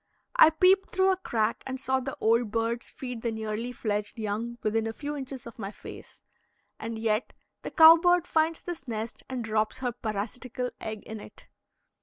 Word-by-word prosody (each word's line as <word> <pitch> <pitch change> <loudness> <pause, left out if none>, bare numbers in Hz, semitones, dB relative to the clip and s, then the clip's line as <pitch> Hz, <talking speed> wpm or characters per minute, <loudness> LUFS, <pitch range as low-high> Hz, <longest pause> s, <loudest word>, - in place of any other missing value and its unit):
I - - +9
peeped 375 +4 +4
through 380 +1 +3
a - - +2
crack 230 -11 -1
and 265 0 -4
saw 265 0 +1
the 265 +1 -5
old 230 0 +3
birds 230 +2 -1
feed 250 -3 -6
the 235 - -1
nearly 220 +2 -3
fledged 210 -3 -3
young 225 +2 -3
within 225 +1 +1
a 225 - -3
few 295 +4 -5
inches 270 -2 -6
of 235 0 -11
my 195 -2 -4
face. - - -12 0.6
And 230 0 -4
yet 220 +1 0 0.3
the - - -5
cow 325 +1 +9
bird 355 0 +3
finds 320 -1 +1
this 330 -6 -7
nest 225 0 -4
and 255 -2 -3
drops 215 -1 0
her 250 -2 -1
parasitical 235 +3 -4
egg 215 -1 -5
in 220 0 -7
it. - - -13
235 Hz, 185 wpm, -28 LUFS, 220-275 Hz, 0.6 s, I